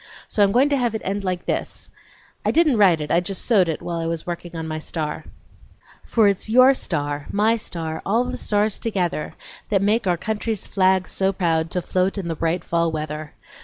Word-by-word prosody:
So 210 - -1
I'm 200 -1 +5
going 260 +6 +4
to 285 - +2
have 240 -3 0
it 220 - -4
end 200 +1 -2
like 180 -2 -2
this: - - -3 0.5
I - - +1
didn't 310 -7 +3
write 180 -6 +5
it, 150 - -4
I 170 - +4
just 185 +2 -4
sewed 195 -8 +4
it 160 - -3
while 170 -1 -3
I 165 - -2
was 165 -1 -3
working 175 0 -6
on 160 -1 -4
my 155 0 -3
star: 155 -1 -4 0.8
For 220 -3 +3
it's 200 +1 0
your 255 +4 +7
star, 145 - -3
my 215 +3 +3
star, 165 -7 -4
all 225 +6 +2
the - - -4
stars 210 0 0
together, 180 -8 -2 0.4
That 200 -2 +2
make 210 +1 +2
our 175 -1 +2
country's 220 +2 -3
flag 190 -1 +2
so 190 0 0
proud 165 -4 0
To 180 0 -2
float 185 +4 0
in 180 -4 -3
the 165 - -2
bright 165 +2 -1
fall 170 -1 +1
weather. 155 -1 -5
185 Hz, 210 wpm, -22 LUFS, 165-210 Hz, 0.8 s, your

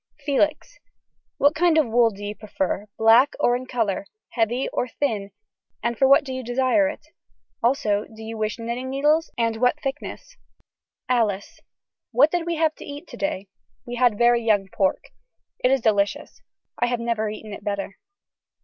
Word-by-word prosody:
(Felix.) 305 - 0 0.6
What 285 +1 +4
kind 335 0 +3
of 310 - +4
wool 235 0 +3
do 205 -1 -9
you 205 - -3
prefer 205 -1 -3
black 225 +5 +5
or 245 -4 +3
in 255 +1 -5
color, 220 -6 -1 0.2
heavy 240 +3 0
or 250 - -1
thin 225 -6 -2 0.5
and 235 +1 0
for 265 +4 +3
what 275 - +7
use - - -20
do 260 - -5
you 260 0 -4
desire 260 +5 +2
it. 300 - -8
Do 310 - -26
you 340 - -46
also 215 -4 +1
wish 220 0 -4
knitting 235 +3 -4
needles 300 +4 +2
and 230 -1 0
what 250 +5 +2
thickness. 270 +1 -6 0.7
(Alice.) 220 -6 0 0.5
What 265 +6 +4
did 345 -1 -1
we 340 - 0
have 315 -1 +2
to - - -10
eat 290 +3 -8
today. 200 -9 -4 0.4
We - - -7
had 240 -4 +3
very 240 +1 +4
young 205 -4 +2
pork. 190 -1 0 0.5
It 250 - +2
is 270 -1 +2
very 220 -2 +4
delicious. 200 0 -2 0.4
I 240 - +2
have 240 -1 -1
never 230 -2 -1
eaten 215 0 -8
it - - -9
better. 200 -1 -4
240 Hz, 175 wpm, -23 LUFS, 215-275 Hz, 0.7 s, what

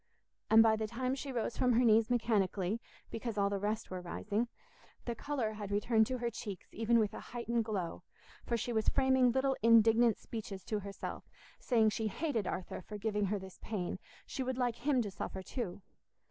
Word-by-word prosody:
And 225 0 +8
by 220 -1 +5
the 220 0 -2
time 255 +3 -1
she 275 0 -4
rose 235 -2 -2
from 250 -1 +3
her 245 +2 +4
knees 220 0 +5
mechanically, 215 -3 +1 0.3
because 225 -1 -4
all 200 0 +2
the 200 - -1
rest 210 +2 -2
were 185 -1 -4
rising, 205 +6 -2 0.6
the 235 - -1
colour 255 -4 -2
had 210 -2 -6
returned 220 +2 +3
to 255 - -2
her 235 -1 -2
cheeks 205 -4 -6
even 230 +1 +2
with 215 -2 +2
a - - -6
heightened 235 -1 -2
glow, 190 -6 -3 0.4
for 235 - 0
she 240 +2 -2
was 220 -1 +2
framing 260 -2 +4
little 265 +2 +1
indignant 230 0 +6
speeches 200 -4 -7
to 215 - -1
herself, 200 0 -6 0.3
saying 225 -4 +3
she 220 +1 -1
hated 245 - -1
Arthur 185 - -4
for 210 +3 -8
giving 210 0 0
her 205 +2 0
this 190 -1 -10
pain—she 195 +5 -5
would 255 -1 -2
like 245 -2 0
him 260 -1 +2
to 205 - -5
suffer 190 0 -5
too. 200 -4 -5
225 Hz, 190 wpm, -34 LUFS, 205-240 Hz, 0.6 s, And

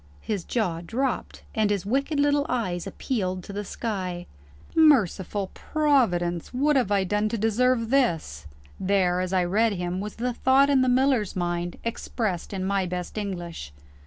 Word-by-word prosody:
His 200 -5 -3
jaw 180 -8 -1
dropped, 250 +8 -3
and 215 -2 +2
his 200 -3 -1
wicked 275 +7 0
little 285 0 +2
eyes 185 -8 -2
appealed 185 -8 -2
to 200 - -9
the 205 +1 -3
sky. 185 -5 -4 0.5
Merciful 205 - +3
Providence! 205 - +1
what 290 +4 +2
have 245 -7 +2
I 200 -1 +3
done 210 +3 0
to 230 - -2
deserve 230 +2 +1
this? 165 - 0 0.3
There, 185 -2 +2
as 185 0 -2
I 185 -1 +2
read 210 +5 +2
him, 180 0 -3
was 210 +1 -5
the 245 +2 -2
thought 270 +3 +4
in 270 -2 +4
the 255 - +3
miller's 255 -5 +2
mind, 175 -1 -2
expressed 220 -5 -3
in 190 -2 -3
my 195 -1 0
best 180 0 -5
English. 175 - -5
205 Hz, 160 wpm, -25 LUFS, 180-250 Hz, 0.5 s, thought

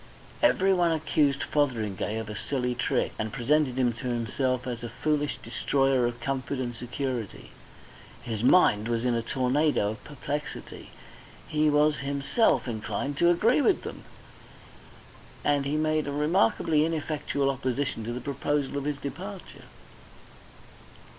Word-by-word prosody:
Everyone 190 - +4
accused 150 -3 +1
Fotheringay 110 -7 -1
of 110 -1 -4
a 105 - -6
silly 125 +1 -2
trick, - - 0
and 110 0 -2
presented 135 +1 +1
him 125 -2 +2
to 125 +3 -6
himself 125 +2 -1
as 120 -2 -4
a 120 - -4
foolish 150 +1 -1
destroyer 135 -3 +1
of 120 0 -5
comfort 135 +2 -2
and 125 -2 -3
security. 125 -2 -4 0.7
His 115 -3 -4
mind 115 - +5
was 120 0 -1
in 125 - +2
a 115 - +1
tornado 130 -2 +1
of 110 - -9
perplexity, 145 +1 -6 0.6
he 155 0 +2
was 150 +1 +3
himself 140 - +1
inclined 110 +4 -3
to 170 - +5
agree 220 - +4
with 385 +4 +2
them, - - -7 1.4
and 145 -1 +1
he 145 - -1
made 155 -1 +1
a - - -2
remarkably 150 +1 +2
ineffectual 150 -3 -1
opposition 135 -2 -2
to 115 - -4
the 125 +1 -4
proposal 140 +1 -1
of 140 - -6
his 145 -1 -1
departure. 180 +8 -8
140 Hz, 140 wpm, -27 LUFS, 120-150 Hz, 1.4 s, mind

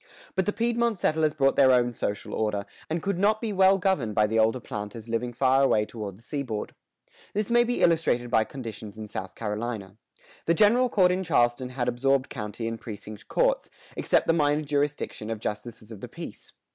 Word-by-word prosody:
But 190 0 0
the - - +3
Piedmont 235 -2 0
settlers 155 -2 +1
brought 135 -2 +3
their 130 -1 +6
own 120 -1 +3
social 100 -2 -3
order, 105 -2 -1 0.2
and 160 +1 -2
could 195 -2 -1
not 215 +2 +3
be 220 -2 -3
well 190 0 +5
governed 165 - 0
by 105 - +4
the 110 +1 +1
older 110 +3 +3
planters 105 0 -7
living 115 +1 -2
far 130 +2 +3
away 110 -6 +3
toward 105 -4 -7
the 115 - -20
seaboard. 125 -5 -4 0.6
This 210 +2 -1
may 240 0 +5
be 245 +1 -1
illustrated 155 -8 +2
by 110 -2 +4
conditions 110 -5 -8
in 110 - -6
South 95 -3 -6
Carolina. 105 -2 -4 0.5
The 170 - +3
general 235 +6 +4
court 185 -5 +4
in 185 +1 0
Charleston 125 -6 +1
had 125 -1 -2
absorbed 135 +2 +1
county 110 -1 -5
and 115 0 -5
precinct 105 -1 -9
courts, - - +1 0.3
except - - +2
the 165 - +3
minor 150 -1 +2
jurisdiction 145 -6 -2
of 115 - -2
justices 110 +1 -6
of 110 - -8
the - - -6
peace. - - -9
125 Hz, 195 wpm, -27 LUFS, 110-170 Hz, 0.6 s, their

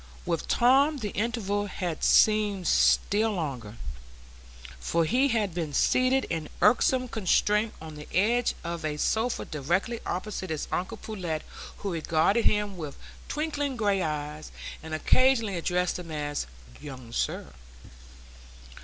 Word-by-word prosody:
With 165 - -2
Tom 275 +5 +4
the 210 -6 -4
interval 205 -2 -1
had 175 -4 -4
seemed 210 -3 +4
still 215 +2 +3
longer, 130 - -4 1.0
for 165 - +1
he 255 - +3
had 220 -7 0
been 160 -4 -3
seated 255 +1 +3
in 160 -3 -3
irksome 250 +5 +4
constraint 210 0 +1
on 160 -1 -9
the 150 0 -10
edge 230 +6 +2
of 170 -1 -4
a 150 -1 -2
sofa 225 +9 0
directly 175 - -1
opposite 190 0 -4
his 155 -2 -3
uncle 185 - -2
Pullet, 175 -8 -4 0.3
who 200 -3 -4
regarded 165 +7 +2
him 210 -2 +1
with 150 -4 -6 0.3
twinkling 290 -3 -2
gray 205 -4 +1
eyes, 150 -1 -4 0.3
and 160 0 -5
occasionally 230 +3 +3
addressed 180 +1 0
him 175 -2 -9
as 145 - -3 0.3
"Young 130 -5 -9
sir." 115 - -2
190 Hz, 130 wpm, -28 LUFS, 155-225 Hz, 1.0 s, Tom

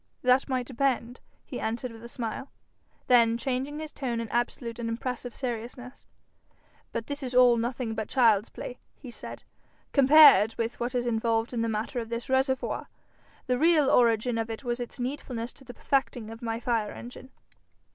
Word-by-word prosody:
'That 255 +2 +3
might 255 -2 0
depend,' 250 -1 -1 0.3
he 250 - -6
answered 230 +2 -3
with 225 0 -12
a 235 - -8
smile. 240 +3 -5 0.6
Then 230 -2 +5
changing 265 +3 -2
his 310 0 -6
tone 245 -4 -3
in 230 -2 -4
absolute 235 0 -2
and 230 -1 -2
impressive 245 +1 -4
seriousness, 245 +1 -6 0.8
'But 230 - -3
this 285 +2 -5
is 255 -2 -4
all 250 -1 +7
nothing 235 0 -2
but 220 -1 -4
child's 225 -5 +3
play,' 250 - -8 0.2
he 255 -4 -11
said, - - -9 0.5
'compared 275 -6 +7
with 230 +1 -3
what 245 +2 -2
is 245 -1 0
involved 225 0 0
in 235 - -1
the 230 - 0
matter 220 +4 -2
of 225 -1 -6
this 235 +2 -4
reservoir. 265 0 0 0.6
The 250 -1 0
real 310 -3 +4
origin 230 0 +3
of 225 0 -2
it 225 +4 -6
was 240 -1 -2
its 245 +2 -6
needfulness 245 -2 -4
to - - -16
the 245 -2 -11
perfecting 245 -5 -1
of 225 - -10
my 225 -1 -2
fire 230 -3 -1
engine.' 250 +2 -10
240 Hz, 175 wpm, -28 LUFS, 230-260 Hz, 0.8 s, all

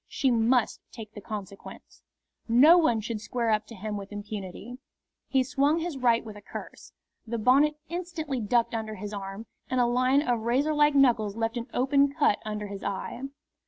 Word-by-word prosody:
She 265 - 0
must 235 +1 +2
take 220 -3 -10
the 205 - -9
consequence. 200 -2 -9 0.5
No 260 +9 +7
one 240 -9 +2
should 220 0 -4
square 230 +1 -1
up 215 0 0
to 230 - -10
him 210 +1 -5
with 200 0 -8
impunity. 205 +3 -7 0.5
He 265 -1 +2
swung 280 +4 +1
his 335 -2 -3
right 240 -3 +2
with 215 -2 -9
a 205 - -11
curse. - - -10 0.4
The 235 +1 -2
bonnet 275 +7 +4
instantly 335 -6 -4
ducked 235 +3 +1
under 220 -1 -3
his 210 +1 -7
arm, 195 +2 -6 0.2
and 255 -1 0
a 245 - +4
line 255 +4 +2
of 240 -2 +1
razor 260 +7 +1
like 295 -1 +3
knuckles 235 -7 +3
left 225 +1 -1
an 240 0 -4
open 275 +2 +2
cut 285 -8 +2
under 210 -1 -4
his 200 -1 -7
eye. 200 +4 -4
235 Hz, 185 wpm, -27 LUFS, 215-270 Hz, 0.5 s, No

